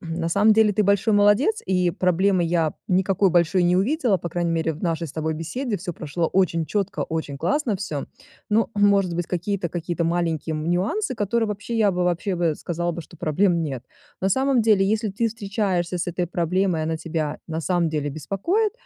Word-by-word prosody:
на 165 0 -3
самом 205 +5 +4
деле- 215 -1 +4
ты 210 - +3
большой 200 +2 +2
молодец, 205 - +3
и 180 -2 +2
проблемы 185 +1 +2
я 165 -2 0
никакой 190 +1 +2
большой 175 +1 +3
не 175 +1 +3
увидела, 230 - +1
по 170 - -5
крайней 170 0 -1
мере 165 -1 0
в 155 - -11
нашей 165 -1 -1
с 140 - -10
тобой 160 0 -2
беседе. 205 - -3
Всё 175 -1 -5
прошло 165 +2 -2
очень 170 -4 +1
чётко, 200 0 -2
очень 160 -3 -3
классно 210 - 0
всё. 155 -8 -4 0.4
Ну, 220 +1 +2
может 200 -3 +3
быть, 175 0 -2
какие-то 180 0 -2
какие-то 170 0 -3
маленькие, 165 -2 -1
м, 155 +2 -2
нюансы, 215 - 0
которые 225 +1 0
вообще, 210 +3 -5
я 215 -3 +4
бы 180 -1 -1
вообще 180 +2 0
бы 170 -3 +1
сказала 175 +2 -3
бы, 170 - -6
что 170 - -16
проблем 170 +2 +1
нет. 135 -6 -4 0.4
На 190 - +1
самом 265 +4 +2
деле, 210 -3 +4
если 215 +1 0
ты 230 +4 0
встречаешься 195 -5 -2
с 175 - -2
этой 175 0 -2
проблемой, 175 0 0
она 160 0 -1
тебя 155 -2 -3
на 160 0 -3
самом 175 0 +1
деле 150 -2 -2
беспокоит 335 - -1
180 Hz, 195 wpm, -23 LUFS, 165-205 Hz, 0.4 s, самом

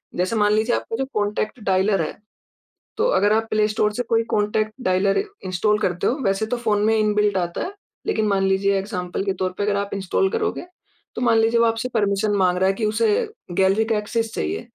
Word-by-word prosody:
जैसे 185 +5 0
मान 210 0 +3
लीजिए 220 +3 +2
आपका 225 - -4
जो 270 - -1
कॉन्टैक्ट 210 +2 -2
डायलर 190 0 +2
है, 160 - -4 0.8
तो 450 - +1
अगर 210 - +3
आप 225 0 +1
प्ले 215 0 +3
स्टोर 210 0 0
से 245 +3 -2
कोई 230 0 +3
कॉन्टैक्ट 215 +1 0
डायलर 195 - +2 0.2
इंस्टॉल 210 +4 +1
करते 180 -3 0
हो 245 - +1
वैसे 195 +2 +1
तो - - +1
फ़ोन 215 -3 0
में 220 0 +3
इनबिल्ट 210 -2 +2
आता 175 -1 -2
है। 370 - -5 0.4
लेकिन 220 -1 +1
मान 195 -1 +1
लीजिए 195 +1 +2
एग्ज़ाम्पल 190 -2 -4
के 195 - 0
तौर 185 - 0
पे - - -1
अगर 205 0 +1
आप 200 0 -2
इंस्टॉल 195 - 0
करोगे, 445 -5 -2 0.5
तो - - -4
मान 230 -2 +3
लीजिए 230 +1 +3
वो - - +5
आपसे 225 +2 -1
परमिशन 205 -1 +1
माँग 180 -1 +2
रहा 190 +1 +2
है - - +2
कि 215 +1 -2
उसे 215 +1 +1 0.4
गैलरी 195 +4 +2
का 220 -1 0
एक्सेस 225 +2 -2
चाहिए। 80 +2 -2
210 Hz, 215 wpm, -22 LUFS, 195-225 Hz, 0.8 s, वो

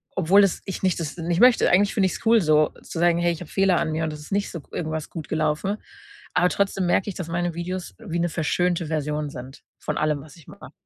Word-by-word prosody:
obwohl 190 +3 +5
es 195 - +1
ich 195 - -6
nicht 185 -2 +1
das 155 -3 -4
nicht 170 +1 -1
möchte, 250 0 +6
eigentlich 195 +3 +3
finde 195 -3 +3
ich's 185 - -6
cool 225 0 +5
so, 155 -2 +4
zu 165 - -6
sagen: 170 0 +4
„Hey, 175 0 +2
ich 170 - -6
habe 175 - -9
Fehler 195 -2 +2
an - - -1
mir 160 +1 -1
und 160 - -1
das 150 - -8
ist 150 - -12
nicht 200 +1 0
so 170 - -6
g - - -28
irgendwas 160 -2 -3
gut 160 -3 -8
gelaufen.“ 155 +6 0 0.6
Aber 180 - +3
trotzdem 195 -1 0
merke 185 +3 +1
ich, 195 - -6
dass 180 - -5
meine 175 0 -1
Videos 175 +2 -5
wie 185 -7 -4
'ne 175 0 +1
verschönte 170 +1 0
Version 150 -1 -2
sind 130 0 -10 0.2
von - - -3
allem, 150 -2 0
was 145 -1 -14
ich 160 - -18
mache. - - -12
170 Hz, 255 wpm, -24 LUFS, 155-185 Hz, 0.6 s, möchte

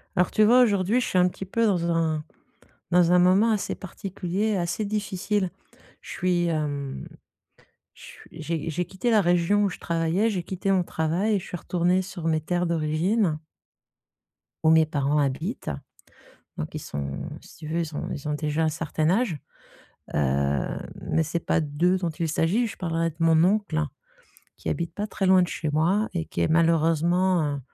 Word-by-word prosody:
Alors, 180 - +3
tu 215 - +3
vois? 245 +4 +6
Aujourd'hui, 210 +1 +2
je - - -2
suis - - 0
un 180 0 +5
petit 190 +1 -6
peu 230 +4 0
dans 175 -5 +1
un 160 -2 0 0.7
dans 175 -1 +4
un 180 - +6
moment 185 +5 +4
assez 210 - -1
particulier, 195 +2 -3
assez 175 +4 -1
difficile. 200 -2 -1 0.5
Je - - -12
suis, 175 -1 +1
hem 145 -4 -3 0.9
ch - - -14
j'ai 160 0 -4
j'ai 175 +3 -2
quitté 190 +7 -3
la 220 -3 +5
région 175 +3 +2
où 200 - +2
je - - -9
travaillais, 170 +6 0
j'ai 190 -5 -2
quitté 195 +2 -2
mon 185 -2 +3
travail, 170 +7 0
et - - +1
je 185 - -10
suis 175 - -5
retournée 180 +2 +1
sur 180 -3 -8
mes 160 -1 +2
terres 175 +3 -1
d'origine 165 +3 +1 1.2
où 160 - +5
mes 160 0 +6
parents 145 -1 0
habitent, 145 - -2 0.9
donc 75 - -5
ils - - -2
sont 70 -1 -5
si - - -16
tu 155 - -9
veux, 165 +2 -1
ils 160 -2 -3
ont - - -4
ils 145 - -5
ont 150 - 0
déjà 150 +1 -1
un 160 - +2
certain 155 0 -1
âge. 195 -3 +1 0.8
Heu, 70 -1 0 0.3
mais 160 - +1
c'est 165 +2 -2
pas - - +2
d'eux 160 +5 +1
dont 175 -2 -2
il 165 +1 -3
s'agit. 175 +10 +1
Je 225 - -7
parlerai 165 -2 -1
de 160 - -18
mon 165 -1 +4
oncle, 195 -4 +1 0.8
qui - - -7
habite 170 -1 -2
pas 210 - -3
très 195 -2 -2
loin 185 0 +6
de 175 - -1
chez 155 -3 -3
moi, 175 +8 +2
et 165 -2 -1
qui - - -5
est - - +2
malheureusement, 165 0 +2
heu, - - -6
170 Hz, 185 wpm, -25 LUFS, 160-190 Hz, 1.2 s, vois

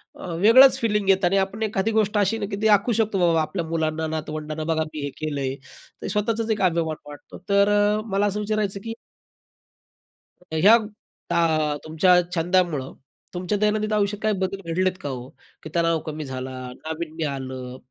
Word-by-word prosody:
अ, - - -9
वेगळंच 230 +9 +7
फिलिंग 210 -3 0
येतं. 190 -1 +4
आणि 195 +3 +2
आपण 195 +3 -1
एखादी 215 0 0
गोष्ट 215 -1 +1
अशी 205 +2 +2
ना, 210 - -3
की 200 0 -4
ती 220 - +3
दाखवू 210 +3 +4
शकतो, 215 -2 0
बाबा, 170 -2 +3
आपल्या 170 +2 -3
मुलांना, 160 -1 -1
नातवंडांना, 155 0 -4
बघा, 160 0 0
मी 150 - -5
हे 145 - -2
केलं 150 -2 -3
आहे. 135 0 -2 0.5
ते - - -4
स्वतःचाच 220 +3 -1
एक 215 - -1
अभिमान 165 -3 +1
वाटतो. 145 - -11
तर 200 0 +4
अ, 205 +1 +2
मला 200 +1 +2
असं 205 0 -1
विचारायचं, 210 -2 -1
की 225 - -4 1.5
अ, - - -22
ह्या 195 +8 +7 0.5
अ, 155 -3 +1
तुमच्या 160 +4 +2 0.2
छंदामुळं, 170 -5 0 0.4
तुमच्या 180 +3 -2
दैनंदिन 215 +1 0
आयुष्यात 205 -1 0
काही 215 0 +2
बदल 190 +1 -2
घडलेत 185 +2 +2
का 145 - -4
हो? 125 -2 -6 0.4
की 155 - -7
तणाव 165 -1 +2
कमी 155 -1 -5
झाला, 130 -1 -5 0.2
नाविन्य 160 +1 -5
आलं. 130 -2 -6
185 Hz, 180 wpm, -23 LUFS, 155-210 Hz, 1.5 s, वेगळंच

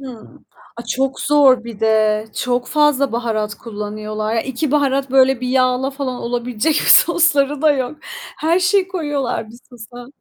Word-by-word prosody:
Hımm. 250 -5 -12 0.3
A, 235 - -8
çok 270 +1 -2
zor 270 -5 +3
bir 230 -3 -10
de. 215 -1 +2
Çok 245 0 -2
fazla 295 -3 +1
baharat 220 -3 -2
kullanıyorlar. 215 0 -5
Ya, 225 - +1
2 265 +4 -3
baharat 275 -2 0
böyle 265 -1 +3
bir 250 - -3
yağla 255 +1 +1
falan 270 -2 -4
olabilecek 245 +4 -2
sosları 295 -6 +3
da 310 -1 +5
yok. 265 +1 -3 0.4
Her 330 +3 +1
şeyi 370 +1 +2
koyuyorlar 290 - -3
bir 235 - -14
sosa. 245 0 -12
255 Hz, 155 wpm, -18 LUFS, 230-285 Hz, 0.4 s, da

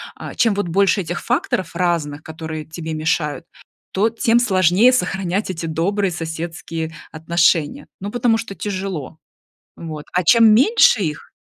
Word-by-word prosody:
а, - - -8
чем 225 -3 +3
вот 200 -2 -2
больше 195 +3 +2
этих 175 0 -5
факторов 245 - -1
разных, 165 -4 -1
которые 160 -1 -7
тебе 160 0 -6
мешают, 155 0 -1 0.5
то 210 +4 +2
тем 230 +1 +2
сложнее 190 +1 +4
сохранять 190 -2 -1
эти 170 -2 -4
добрые 185 +5 0
соседские 165 0 -5 0.2
отношения, 160 -1 +1
ну, 200 +2 -5
потому 240 -2 +2
что 225 -3 -6
тяжело. 185 -6 -5 0.6
Вот. 155 -3 -8
А 180 -1 +1
чем 225 +1 +6
меньше 270 - +5
их, 150 -4 -5
175 Hz, 140 wpm, -20 LUFS, 160-205 Hz, 0.6 s, чем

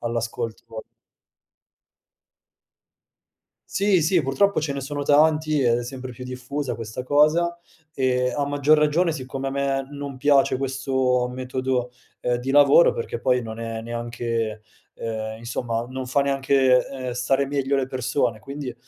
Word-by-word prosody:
all'ascolto. 115 -1 -4 2.9
Sì, 195 -3 +2
sì. 170 +3 +3
Purtroppo 155 +7 +2
ce 150 -2 -2
ne 140 - -4
sono 145 +2 -4
tanti 155 0 +3
e 120 -2 +3
è 120 - -4
sempre 130 0 -7
più 125 +1 -9
diffusa 130 +2 -4
questa 115 +2 -6
cosa, 155 +5 +3 0.4
e 125 -2 +1
a 145 - 0
maggior 145 +2 +3
ragione 160 +3 +2
siccome 135 -2 -5
a - - -1
me 135 0 -1
non 140 -1 -6
piace 140 -1 +3
questo 130 -1 0
metodo, 130 -1 -2 0.3
ehm, 120 0 0
di 125 +2 -4
lavoro 145 +4 +6
perché 115 0 -4
poi 125 -1 +2
non 110 0 -7
è 115 -1 -4
neanche, 115 -2 -3 0.3
ehm, 110 -1 -4
insomma 115 0 -3
non 130 0 -5
fa 135 +3 +1
neanche, 135 -2 +3
ehm, 130 -2 -5
stare 135 +3 +1
meglio 140 0 0
le 135 - 0
persone 125 -3 -1
quindi, 140 +1 -6
130 Hz, 145 wpm, -23 LUFS, 120-140 Hz, 2.9 s, lavoro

